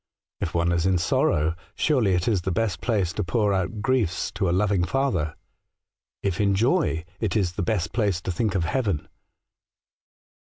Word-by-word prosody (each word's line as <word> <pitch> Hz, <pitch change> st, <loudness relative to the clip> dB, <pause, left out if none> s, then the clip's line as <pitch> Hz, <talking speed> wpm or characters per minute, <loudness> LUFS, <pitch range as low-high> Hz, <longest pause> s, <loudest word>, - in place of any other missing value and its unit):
If 80 Hz, -, -3 dB
one 85 Hz, 0 st, +2 dB
is 85 Hz, +1 st, +1 dB
in 95 Hz, -1 st, +3 dB
sorrow, 80 Hz, -1 st, +2 dB, 0.2 s
surely 120 Hz, -, +2 dB
it 90 Hz, 0 st, -1 dB
is 105 Hz, -6 st, +2 dB
the 90 Hz, -, -2 dB
best 110 Hz, +1 st, -1 dB
place 100 Hz, -8 st, 0 dB
to 105 Hz, -, -2 dB
pour 100 Hz, +3 st, +1 dB
our 95 Hz, -2 st, +1 dB
griefs 105 Hz, -1 st, -1 dB
to 95 Hz, -, -1 dB
a -, -, +2 dB
loving 95 Hz, 0 st, +2 dB
Father; 90 Hz, -, 0 dB, 0.9 s
if 100 Hz, 0 st, 0 dB
in 100 Hz, -1 st, +3 dB
joy, 110 Hz, -, +1 dB
it 110 Hz, -2 st, -1 dB
is 95 Hz, -5 st, +1 dB
the 95 Hz, -, -4 dB
best 90 Hz, -1 st, -1 dB
place 100 Hz, -6 st, +1 dB
to 95 Hz, -, -3 dB
think 100 Hz, +3 st, -1 dB
of 90 Hz, -, +1 dB
heaven.' 100 Hz, -, -1 dB
95 Hz, 180 wpm, -25 LUFS, 85-110 Hz, 0.9 s, in